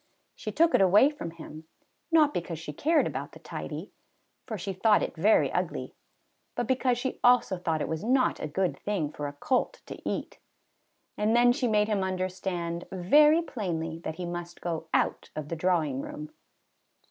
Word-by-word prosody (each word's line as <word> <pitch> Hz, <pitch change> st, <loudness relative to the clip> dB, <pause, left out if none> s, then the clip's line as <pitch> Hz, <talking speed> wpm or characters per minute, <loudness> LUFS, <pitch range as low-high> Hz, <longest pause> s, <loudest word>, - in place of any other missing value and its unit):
She -, -, -6 dB
took 335 Hz, 0 st, +3 dB
it -, -, +5 dB
away 205 Hz, +9 st, +6 dB
from 230 Hz, -, -6 dB
him, 160 Hz, -1 st, -11 dB, 0.5 s
not 305 Hz, -3 st, +5 dB
because 170 Hz, -1 st, -3 dB
she 155 Hz, -1 st, -7 dB
cared 310 Hz, -, +2 dB
about -, -, -5 dB
the -, -, -12 dB
tidy, -, -, -7 dB, 0.6 s
for 220 Hz, -4 st, -4 dB
she 195 Hz, +1 st, -4 dB
thought 210 Hz, +3 st, +3 dB
it -, -, -4 dB
very 200 Hz, +7 st, +3 dB
ugly; -, -, -3 dB, 0.6 s
but 240 Hz, -, -1 dB
because 255 Hz, 0 st, +1 dB
she 255 Hz, +1 st, -3 dB
also 245 Hz, -5 st, +4 dB
thought 160 Hz, -3 st, -1 dB
it -, -, -1 dB
was 160 Hz, +3 st, -3 dB
not 255 Hz, +3 st, +2 dB
a -, -, -3 dB
good 180 Hz, +4 st, -1 dB
thing 185 Hz, -8 st, -2 dB
for 145 Hz, -1 st, -5 dB
a 145 Hz, -, -6 dB
colt 260 Hz, -, -1 dB
to -, -, -9 dB
eat. -, -, -4 dB, 0.8 s
And 215 Hz, +2 st, +2 dB
then 245 Hz, 0 st, +6 dB
she 250 Hz, 0 st, -1 dB
made 210 Hz, -2 st, +2 dB
him 205 Hz, -3 st, 0 dB
understand 185 Hz, -2 st, -3 dB
very 295 Hz, -, +5 dB
plainly 165 Hz, -, -4 dB
that 160 Hz, -1 st, -5 dB
he 180 Hz, +1 st, -5 dB
must 175 Hz, 0 st, -6 dB
go 165 Hz, -2 st, -4 dB
out -, -, 0 dB
of 150 Hz, -1 st, -5 dB
the 165 Hz, -, -2 dB
drawing 160 Hz, -6 st, 0 dB
room. 150 Hz, +2 st, -8 dB
185 Hz, 180 wpm, -28 LUFS, 165-245 Hz, 0.8 s, away